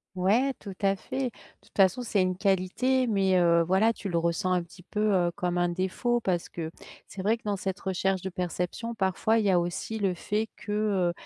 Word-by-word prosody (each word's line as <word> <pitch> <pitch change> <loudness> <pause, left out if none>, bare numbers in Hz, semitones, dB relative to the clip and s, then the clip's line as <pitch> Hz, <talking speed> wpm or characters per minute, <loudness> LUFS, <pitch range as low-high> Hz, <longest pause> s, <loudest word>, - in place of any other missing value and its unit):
Ouais, 215 +9 +2
tout 195 -3 -8
à 195 0 +3
fait. 260 +6 -3 0.3
Toute - - -24
façon, 195 +5 +4
c'est 220 -4 +1
une 185 -1 +1
qualité 200 +7 +1
mais, 195 -4 +2
heu, 170 -1 +4
voilà, 200 +6 +3
tu 200 - -5
le 170 - +1
ressens 170 +3 0
un 180 -1 +2
petit 175 +1 -15
peu, 210 +4 -4
heu, 175 -2 +3
comme 180 0 -1
un 175 0 +2
défaut 190 +7 0
parce 180 -5 -1
que 160 -2 -5 0.4
c'est 195 - -7
vrai 220 +4 +2
que - - -33
dans 205 -1 0
cette 190 +1 -4
recherche 190 0 0
de 190 - -4
perception 180 +5 -3
parfois 215 +2 +1
il 215 - +1
y - - +4
a 180 - +4
aussi 175 +6 -3
le 195 -3 +1
fait 210 +5 -2
que, - - -8
heu, 200 -5 +1
190 Hz, 220 wpm, -28 LUFS, 180-215 Hz, 0.4 s, façon